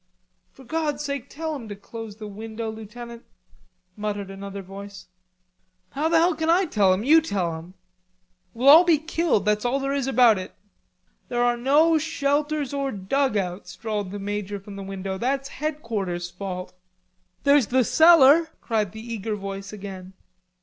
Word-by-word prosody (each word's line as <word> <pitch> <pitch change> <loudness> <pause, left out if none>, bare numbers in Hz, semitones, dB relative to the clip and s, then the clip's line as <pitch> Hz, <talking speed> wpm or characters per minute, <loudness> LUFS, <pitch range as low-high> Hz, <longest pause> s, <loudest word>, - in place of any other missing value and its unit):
"For 265 - -16
God's 295 +1 -2
sake 280 -2 -4
tell 315 +1 -4
him 235 -6 -8
to 205 - -5
close 220 +1 -9
the 215 0 -9
window, 220 +2 -6
Lieutenant," 235 +2 -9 0.7
muttered 205 -2 -4
another 195 0 -7
voice. 200 +1 -10 0.9
"How 300 +4 0
the 330 - +4
hell 340 +2 +4
can 320 +1 -2
I 360 +3 +4
tell 205 - +3
him? 185 +3 +1
You 315 +6 +6
tell 185 - -2
him." 170 +3 -11 0.8
"We'll 250 +4 0
all 320 +5 +10
be 340 -3 +4
killed, 315 - 0
that's 210 0 +1
all 250 +3 +1
there 275 0 -2
is 275 -2 -1
about 240 -5 +5
it." 185 - -8 0.7
"There 240 0 0
are 240 0 +3
no 300 +6 +4
shelters 295 -2 -1
or 275 -1 -1
dugouts," 200 -3 -1
drawled 210 -3 -3
the 205 - -6
major 205 0 -4
from 200 +1 -11
the 200 - -7
window. 195 0 -5
"That's 270 +3 -1
Headquarters' 215 - -3
fault." 185 0 -6 0.7
"There's 280 -4 +4
the 255 +1 +3
cellar!" 320 +2 +6
cried 215 -5 -1
the 230 +2 -7
eager 215 0 -3
voice, 195 0 -6
again. 190 -2 -9
225 Hz, 165 wpm, -24 LUFS, 200-280 Hz, 0.9 s, all